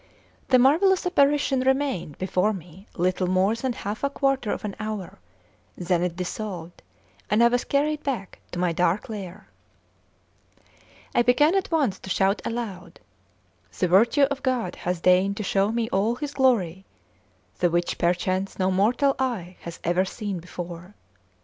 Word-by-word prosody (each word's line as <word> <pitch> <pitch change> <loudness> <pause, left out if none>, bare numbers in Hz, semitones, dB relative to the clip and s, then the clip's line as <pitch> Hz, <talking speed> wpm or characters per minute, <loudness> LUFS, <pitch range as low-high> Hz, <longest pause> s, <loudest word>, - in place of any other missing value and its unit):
The 255 - +5
marvellous 340 +10 +4
apparition 285 -5 +2
remained 265 - 0
before 185 +3 +1
me 180 +1 -11
little 185 +1 0
more 185 +3 +2
than 245 +2 -2
half 210 +1 -5
a 280 - +2
quarter 275 -5 0
of - - -4
an 200 - -4
hour: 215 - -5 0.6
then 175 -1 0
it 175 -1 -1
dissolved, 180 -2 -6 0.5
and 215 +3 +4
I 235 - +6
was 245 0 0
carried 300 +2 0
back 245 -10 -4
to - - -6
my 175 -1 +1
dark 180 +5 0
lair. 200 -2 -7 1.7
I - - +4
began 270 +7 +4
at 390 -1 0
once 285 - +1
to - - -10
shout 195 +2 +1
aloud: 230 -5 -5 0.8
"The 180 - +1
virtue 230 - +4
of 275 0 +1
God 245 -9 -1
hath 175 -1 -3
deigned 185 +2 +3
to 215 - -3
show 195 +1 +1
me 230 0 -1
all 210 +5 +1
His 290 +2 -5
glory, 195 -10 +2 0.8
the 175 - +3
which 175 +1 -1
perchance 185 +2 0
no 190 0 +1
mortal 240 +9 +2
eye 205 -9 -2
hath 170 0 -9
ever 175 +2 +2
seen 195 -1 -4
before. 175 +2 -8
205 Hz, 155 wpm, -25 LUFS, 180-260 Hz, 1.7 s, I